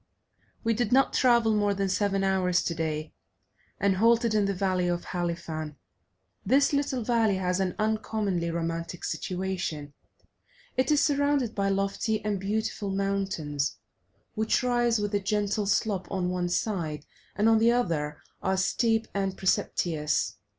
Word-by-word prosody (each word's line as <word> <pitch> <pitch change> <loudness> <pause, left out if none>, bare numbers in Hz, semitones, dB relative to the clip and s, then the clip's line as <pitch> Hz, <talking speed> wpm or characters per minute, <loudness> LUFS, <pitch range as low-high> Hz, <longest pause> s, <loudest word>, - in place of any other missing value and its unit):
We 230 - +2
did 225 -1 -1
not 270 +2 +4
travel 235 -3 +4
more 205 -1 +1
than 195 0 0
seven 195 0 0
hours 185 -2 +2
today, 160 -2 -3 0.7
and 195 -1 +2
halted 230 +1 +3
in 210 -2 +3
the 200 - 0
valley 185 -1 0
of 175 0 -1
Halifan. 165 -3 -4 0.7
This 275 +7 +3
little 275 -3 0
valley 225 -3 +2
has 180 0 0
an 185 -2 -1
uncommonly 215 -5 -1
romantic 165 +1 -3
situation; 180 -6 -3 0.8
it 260 0 +1
is 295 -1 +4
surrounded 285 -5 +1
by 195 -1 0
lofty 195 +2 0
and 205 -2 0
beautiful 205 +1 -2
mountains, 195 -7 -1 0.6
which 220 +3 +1
rise 240 -2 +2
with 205 0 -2
a 205 - +2
gentle 205 0 -1
slope 195 -2 0
on 180 -2 -1
one 180 -1 -1
side, 170 -6 -2 0.3
and 210 +2 +2
on 225 -1 +5
the 230 +1 +5
other 155 -11 -1 0.2
are 190 0 0
steep 225 +4 +1
and 195 -1 -1
precipitous. 160 -4 0
195 Hz, 145 wpm, -27 LUFS, 180-220 Hz, 0.8 s, on